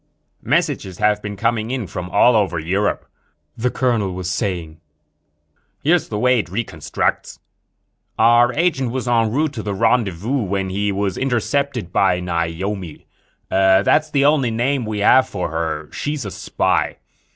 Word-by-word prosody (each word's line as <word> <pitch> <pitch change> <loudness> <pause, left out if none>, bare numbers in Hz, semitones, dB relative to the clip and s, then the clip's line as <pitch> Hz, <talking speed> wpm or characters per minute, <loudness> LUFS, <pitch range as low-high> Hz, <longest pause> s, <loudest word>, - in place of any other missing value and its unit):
"Messages 135 - -1
have 105 0 +2
been 105 -1 -5
coming 115 +1 0
in 125 -3 -2
from 90 0 -6
all 115 +6 +4
over 100 -5 +1
Europe," 95 +6 -1 0.5
the 125 +2 0
colonel 115 -7 0
was 90 -1 -5
saying. 85 -4 -3 1.0
"Here's 170 +4 +2
the 105 - -3
way 125 +2 +3
it 105 - -4
reconstructs: 90 -6 -2 0.8
"Our 120 +2 +5
agent 150 -6 +1
was 125 +1 -4
en 115 -2 +2
route 150 +4 0
to 115 - -5
the 105 -2 -3
rendezvous 115 +2 +1
when 95 -1 -2
he 100 +2 -1
was 100 -1 -2
intercepted 130 - -1
by 90 -2 +3
Naomi. 90 +1 -3 0.4
That's 95 +10 +3
the 140 -2 +2
only 145 -4 +3
name 120 +2 -1
we 105 -1 -3
have 130 +5 +5
for 90 -5 -3
her. 80 -2 -3
She's 145 -4 -4
a 100 - -5
spy. - - -1
105 Hz, 150 wpm, -20 LUFS, 95-125 Hz, 1.0 s, Our